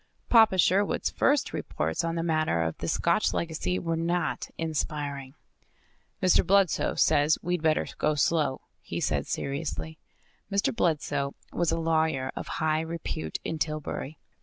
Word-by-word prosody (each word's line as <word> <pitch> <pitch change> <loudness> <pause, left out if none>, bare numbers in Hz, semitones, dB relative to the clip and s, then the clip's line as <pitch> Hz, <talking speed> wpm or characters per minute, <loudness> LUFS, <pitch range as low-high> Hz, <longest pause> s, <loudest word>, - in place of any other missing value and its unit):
Papa 220 -5 +6
Sherwood's 190 +3 +2
first 285 -1 +2
reports 80 - -2
on 165 0 -1
the 165 - -1
matter 155 - +1
of 80 -1 -2
the - - -3
Scotch - - +1
legacy 170 +2 -1
were 165 -2 -1
not 175 +2 -1
inspiring. 145 -4 -3 0.9
"Mr. 185 - +5
Bludsoe 195 -2 +2
says 145 +2 +3
we'd 175 -1 -1
better 155 -1 +2
go 150 0 +2
slow," 145 -1 +1 0.2
he - - -5
said - - -1
seriously. 155 +2 -4 0.5
Mr. 200 +3 +1
Bludsoe 145 -7 0 0.2
was 170 -2 +1
a 165 - 0
lawyer 160 -5 +1
of - - -5
high 155 0 +1
repute 160 - -4
in 160 - -3
Tillbury. 155 -1 -3
160 Hz, 140 wpm, -28 LUFS, 145-170 Hz, 0.9 s, Papa